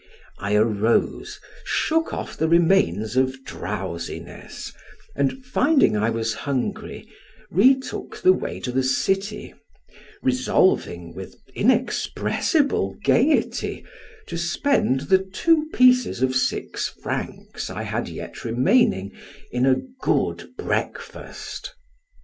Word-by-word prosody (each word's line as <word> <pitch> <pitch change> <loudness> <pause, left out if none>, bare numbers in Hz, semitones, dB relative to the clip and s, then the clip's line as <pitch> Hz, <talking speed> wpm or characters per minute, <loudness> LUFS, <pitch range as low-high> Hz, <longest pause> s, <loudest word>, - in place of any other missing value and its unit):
I 100 +1 0
arose, 110 +1 +1 0.2
shook 325 +1 0
off - - -5
the 160 - 0
remains 160 - +3
of 130 +1 +1
drowsiness, 95 -8 -6 0.4
and 140 - -1
finding 270 - +3
I 105 +2 +1
was 115 0 -1
hungry, 195 - -4 0.4
retook 260 +9 +2
the 370 - +6
way - - -4
to 125 - -3
the 130 +2 +1
city, 195 +10 -1 0.7
resolving, 185 - +1
with 95 +2 -9 0.2
inexpressible 250 - +1
gayety, 285 +6 +1 0.4
to 170 - -5
spend 170 - +1
the 185 +7 +4
two 305 - +1
pieces 250 - +4
of 130 0 +1
six 130 - -1
francs - - -5
I - - -5
had - - -3
yet - - -8
remaining 120 - +2 0.4
in 125 +2 +1
a 130 - +3 0.2
good - - 0
breakfast. - - -5
150 Hz, 105 wpm, -23 LUFS, -, 0.7 s, the